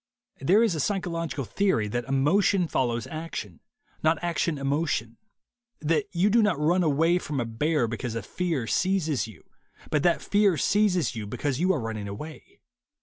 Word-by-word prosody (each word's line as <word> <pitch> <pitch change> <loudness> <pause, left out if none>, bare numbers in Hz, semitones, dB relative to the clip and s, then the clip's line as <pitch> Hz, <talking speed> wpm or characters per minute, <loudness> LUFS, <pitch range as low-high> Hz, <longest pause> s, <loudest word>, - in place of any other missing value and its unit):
There 190 - +4
is 225 -6 +2
a 160 - -3
psychological 165 -6 -2
theory 190 - +1
that 120 +2 -2
emotion 170 +7 +2
follows 120 -5 -1
action, 155 - -6 0.4
and - - -34
not 160 +1 +2
action 170 -2 0
emotion; 140 -5 -1 0.6
that 155 +1 +1
you 185 +4 +2
do 235 +2 +5
not 210 -9 +2
run 170 +5 +2
away 165 +2 +3
from 150 -5 -4
a 120 - -1
bear 120 +4 0
because 115 0 -4
a 115 - -3
fear 165 - -2
seizes 160 - 0
you, 105 -7 -14 0.5
but 150 - +2
that 175 +1 +3
fear 200 -4 +3
seizes 185 - +2
you 105 -2 -5
because 135 +5 -2
you 185 +2 +3
are 170 - 0
running 110 -3 -4
away. 145 +11 -9
155 Hz, 170 wpm, -26 LUFS, 120-180 Hz, 0.6 s, do